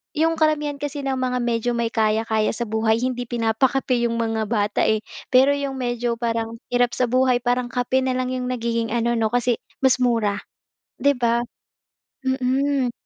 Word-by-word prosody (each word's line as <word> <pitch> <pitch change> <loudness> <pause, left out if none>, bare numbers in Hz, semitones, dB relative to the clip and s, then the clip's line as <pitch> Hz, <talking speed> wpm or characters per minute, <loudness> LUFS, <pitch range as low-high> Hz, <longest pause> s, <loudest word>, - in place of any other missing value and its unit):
yung 325 +1 +2
karamihan 300 -2 +1
kasi 290 0 -4
ng 265 -1 -1
mga 250 -1 0
medyo 235 0 0
may 235 -1 -1
kaya-kaya 220 0 +1
sa 240 - -2
buhay, 220 +1 +1
hindi 245 -1 -2
pinapakape 240 +2 +1
yung 230 - -2
mga 225 -1 0
bata 210 -1 0
eh. 220 -1 +2 0.3
Pero, 265 +2 +6
yung 280 -1 -3
medyo 240 -1 -1
parang 230 -1 -2 0.2
hirap 245 0 +2
sa 250 - +1
buhay, 255 0 +3
parang 245 0 +1
kape 250 +2 +1
na 260 - 0
lang 255 0 -1
yung 255 -1 -3
nagiging 230 -2 -1
ano 235 0 +1
'no, 225 -1 +1
kasi, 245 -1 +1 0.2
mas 260 -1 +4
mura, 225 -5 +1 0.6
'di 285 0 +3
ba? 235 -1 +2 0.9
Mhm. 260 0 +1
245 Hz, 170 wpm, -22 LUFS, 230-260 Hz, 0.9 s, Pero